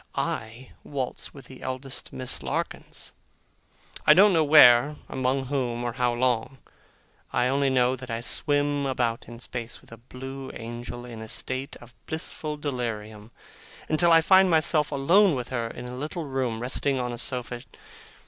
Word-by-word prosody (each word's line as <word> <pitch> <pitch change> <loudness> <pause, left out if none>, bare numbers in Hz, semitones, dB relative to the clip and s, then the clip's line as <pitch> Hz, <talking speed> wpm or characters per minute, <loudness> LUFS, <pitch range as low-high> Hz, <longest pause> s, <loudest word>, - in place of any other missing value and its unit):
I 115 +4 -4
waltz 135 -3 -4
with 135 -3 -13
the 130 +1 -13
eldest 130 +1 -5
Miss 130 -1 -2
Larkins! - - -4 0.9
I 150 - +7
don't 200 +1 +7
know 160 -2 +4
where, 145 -2 +7
among 130 +1 -1
whom, 125 -3 -2
or 120 -1 -2
how 125 -1 +1
long. 125 +1 0 0.7
I 125 - +2
only 140 +1 +2
know 130 -1 +3
that 130 0 -10
I 115 0 -2
swim 145 +2 0
about 120 -3 -1
in 120 - -9
space, 120 -1 -6
with - - -20
a 115 - -10
blue 130 +3 -8
angel, 120 +1 -7
in 115 -2 -8
a 110 - -7
state 130 +4 -3
of 120 0 -15
blissful 155 -1 -4
delirium, 110 -6 -4 0.6
until 170 +2 +4
I 165 0 +7
find 190 +3 +6
myself 155 -2 +3
alone 170 +6 +4
with 125 -1 -4
her 120 -3 -2
in 120 - -8
a 125 - -7
little 155 +5 -4
room, 130 -5 -2
resting 130 +2 0
on 125 -1 -2
a 120 - -5
sofa. 120 0 -3
130 Hz, 165 wpm, -26 LUFS, 120-145 Hz, 0.9 s, I